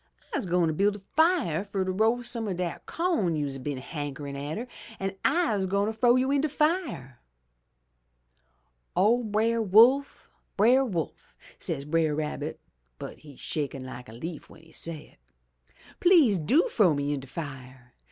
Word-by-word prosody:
Tse - - -2
gwine 170 -2 +2
build 200 +4 +2
a - - -8
fire 305 - +1
fer 200 -2 -2
ter 185 - -1
roast 225 +5 +1
some 230 -2 -3
o' 195 - -1
dat 180 -1 -4
co'n 330 - 0
you'se 145 -3 -2
a 135 0 -4
hankerin' 145 0 -6
atter, 150 - -4 0.3
an' 195 0 -3
I'se 215 - +2
gwine 200 +3 +1
frow 240 +2 +4
you 260 +1 +2
in 280 -1 +2
de 305 - 0
fire!' 295 - -1 1.8
"'O 220 +6 +4
Brer 225 +2 +1
Wolf! 235 +7 +4 0.3
Brer 245 +6 +5
Wolf!' 175 - -5 0.2
says 140 - -3
Brer 155 0 +1
Rabbit 150 0 -4 0.4
(but - - -8
he's 145 -4 -14
shakin' 140 -3 -3
like 125 -1 -9
a - - -11
leaf 160 +7 -7
w'en 160 - -16
he 165 - -19
say 160 - -6
it). - - -41 0.7
Tlease 290 - +5
do 285 - +3
frow 200 - +3
me 145 +1 -1
in 145 - -2
de 135 - -11
fire. 130 -4 -8
185 Hz, 160 wpm, -27 LUFS, 145-235 Hz, 1.8 s, Brer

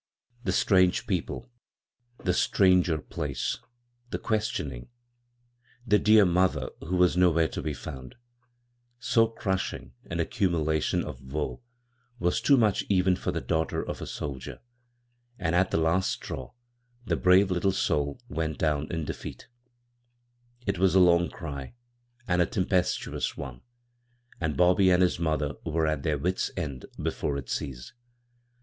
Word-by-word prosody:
The - - 0
strange 95 -3 +3
people, 105 +5 -3 0.7
the 90 - +2
stiangv 90 -4 +3
place^ 70 -3 -2 0.5
the - - -2
questioning, 90 - -2 1.0
the 105 -2 +4
dear 105 -1 +6
mother 90 -7 +1
who 85 +3 -3
was 90 -1 +4
nowhere 85 -3 +4
to - - -5
be - - -3
found 65 -5 -8 0.5
— 120 0 -45
so 115 -1 +3
crushing 95 - -3 0.2
an - - -3
aanimulation 80 -5 0
of - - -8
woe 75 - -4 0.6
was 90 -5 0
too 140 - +5
much 110 -3 +3
for - - -2
even 95 -2 +3
the - - -2
daughter 80 -1 -1
of - - -5
a - - -5
soldier, 65 -3 -6 0.8
and 80 - -1
at 95 +2 +3
the - - 0
last 80 +4 +2
straw - - -5 0.5
the - - +1
brave 95 +1 +4
little 90 +2 +2
soul 75 -6 0
went 80 0 -3
down 75 -1 0
in 80 -3 -2
defeat - - -7 1.2
It 100 -3 -1
was 95 -1 +3
a - - +7
long 85 -1 +5
cry, 70 - -7 0.5
and 90 -1 +2
a 85 - +3
tempestuous 95 -4 -1
one; 65 -3 -7 0.8
and 80 -2 -2
Bobby 90 +2 +5
and 90 0 +5
his 90 -2 +1
mother 75 -3 0
were 80 0 0
at 75 -2 0
their 75 +1 0
wits' 90 +6 -1
end 70 -7 -4
before 70 - -2
it 65 -3 -7
ceased. 60 -4 -5
85 Hz, 145 wpm, -28 LUFS, 75-95 Hz, 1.2 s, a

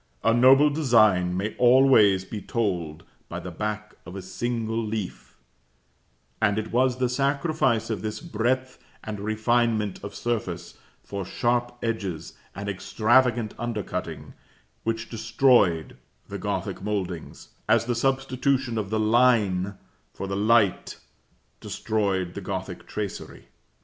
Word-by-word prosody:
A 115 - +4
noble 135 +5 +6
design 110 - +3
may 105 +3 -2
always 120 -7 +5
be 105 +1 -6
told 90 -10 -2 0.3
by - - -5
the - - -7
back 105 0 -4
of 90 +3 -10
a 95 - -5
single 115 +3 -2
leaf, 105 -3 -5 1.0
and 105 -2 +2
it 110 0 -3
was 125 +1 +2
the 130 -1 +1
sacrifice 135 -2 0
of 105 -4 -3
this 110 +1 -4
breadth 130 +4 -2 0.2
and 105 -2 -5
refinement 110 0 0
of 100 - -7
surface 105 -8 -3 0.3
for 100 -1 -5
sharp 120 +5 -1
edges 100 -8 -3 0.2
and 100 +2 -6
extravagant 115 +3 +2
undercutting, 115 -4 -4 0.5
which 115 0 -2
destroyed 115 -7 +2 0.3
the - - -6
Gothic - - -3
mouldings, 95 -5 -4 0.2
as - - +4
the 120 - 0
substitution 130 -1 0
of 100 -2 -4
the 110 +1 0
line 110 -4 +3 0.4
for - - -5
the 95 0 -3
light 105 -1 +2 0.6
destroyed 95 -5 -1
the 100 - -6
Gothic 95 -1 -5
tracery. 105 -3 -6
110 Hz, 125 wpm, -25 LUFS, 100-120 Hz, 1.0 s, noble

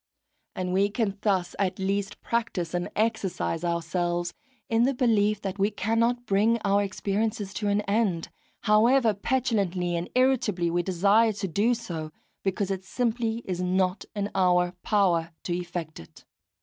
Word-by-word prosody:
And 180 -1 -2
we 200 +2 +3
can 205 -2 -2
thus 190 -4 0
at 190 -2 0
least 195 +1 -2
practise 205 -8 -2
and 175 0 -1
exercise 205 -6 -1
ourselves 175 0 -1 0.3
in 225 0 +2
the 265 +3 +2
belief 215 -4 +2
that 195 0 -4
we 200 +1 +3
cannot 230 +4 0
bring 215 +3 +3
our 200 +1 +3
experiences 205 0 -2
to 210 +2 -2
an 205 +1 +2
end, 200 -5 0 0.3
however 230 +2 +4
petulantly 200 -6 0
and 170 +1 -3
irritably 230 -10 +2
we 175 +1 +1
desire 200 +5 +3
to 200 -1 -3
do 210 +8 +2
so, 165 -9 -6 0.3
because 195 0 -1
it 190 -1 -3
simply 230 +1 -1
is 180 -1 -3
not 185 +1 +1
in 205 0 -2
our 180 -2 +3
power 175 -5 +1
to 175 - -2
effect 175 -2 -5
it. 80 - -15
200 Hz, 150 wpm, -27 LUFS, 180-220 Hz, 0.3 s, however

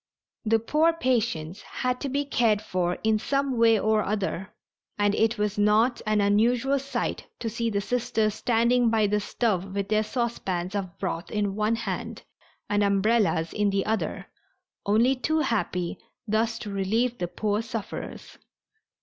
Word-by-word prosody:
The 225 +1 +4
poor 305 +9 +2
patients 230 - -1
had 250 0 -3
to 280 - -2
be 285 +2 -1
cared 230 -6 +2
for 180 -4 -1
in 220 -1 +2
some 275 +2 0
way 230 -2 +5
or 215 0 +2
other, 195 -2 -2 0.5
and 205 0 +2
it 225 +2 +2
was 210 0 -1
not 215 +4 +3
an 215 0 +2
unusual 235 +7 +2
sight 270 -3 -3
to 235 - -4
see 230 +1 -1
the 200 -2 -1
Sisters 220 -1 0
standing 235 +1 +2
by 220 -1 +3
the 210 +1 +1
stove 195 -3 -1
with 200 -1 -2
their 215 0 +3
saucepans 205 -6 -2
of 195 -2 -4
broth 185 -2 -3
in 205 -2 -1
one 215 +2 +1
hand 230 - -5 0.4
and 205 0 +1
umbrellas 200 -5 +2
in 210 -1 +1
the 195 -1 0
other, 220 +1 -2 0.6
only 225 +6 +4
too 315 +5 0
happy 200 - -1 0.3
thus 225 +2 +1
to 205 - -6
relieve 225 +5 0
the 175 - -1
poor 210 +3 -1
sufferers. 225 -2 -7
215 Hz, 160 wpm, -26 LUFS, 200-235 Hz, 0.6 s, way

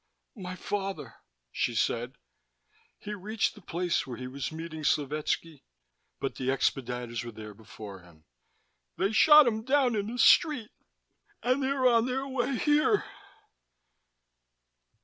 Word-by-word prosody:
"My 185 -2 -6
father," 195 +1 -4 0.4
she 120 - -1
said. 120 +2 -1 0.8
"He 210 - -7
reached 210 +2 -1
the 210 - -15
place 175 -2 -1
where 120 -3 -6
he 125 - -7
was 135 +3 -5
meeting 160 -1 -7
Slovetski, 150 +1 -1 0.6
but 135 - -4
the 130 - -4
expediters 125 -3 -1
were 120 - -7
there 105 -1 -10
before 105 -2 -11
him. 85 -3 -20 0.7
They 195 +2 +1
shot 300 +6 +8
him 220 -2 0
down 260 -2 +2
in 205 -1 -1
the 240 +2 -5
street. 255 -2 +4 0.7
And 255 +3 +1
they 265 - 0
are 270 -2 +2
on 235 -1 +3
their 265 +2 -2
way 265 0 -1
here." 300 - +2
185 Hz, 135 wpm, -29 LUFS, -, 0.8 s, shot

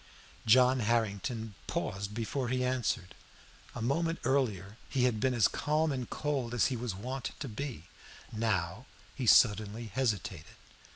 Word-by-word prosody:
John 125 +3 +6
Harrington 110 0 -1
paused 100 +2 -3
before 120 +3 -2
he 125 0 0
answered. 120 -7 -1 0.6
A 120 - -4
moment 165 +7 +1
earlier 110 -7 0
he 130 - +1
had 120 -4 +2
been 130 +2 +1
as 115 - +5
calm 155 +1 0
and 130 -3 -3
cold 135 -5 -2
as 120 - +3
he - - -1
was 120 -4 -3
wont 130 +6 -4
to 140 - -5
be; 125 - -5 0.5
now, 110 0 -1 0.3
he 130 -4 -4
suddenly 110 0 +4
hesitated. 100 -10 -2
120 Hz, 140 wpm, -31 LUFS, 105-130 Hz, 0.6 s, John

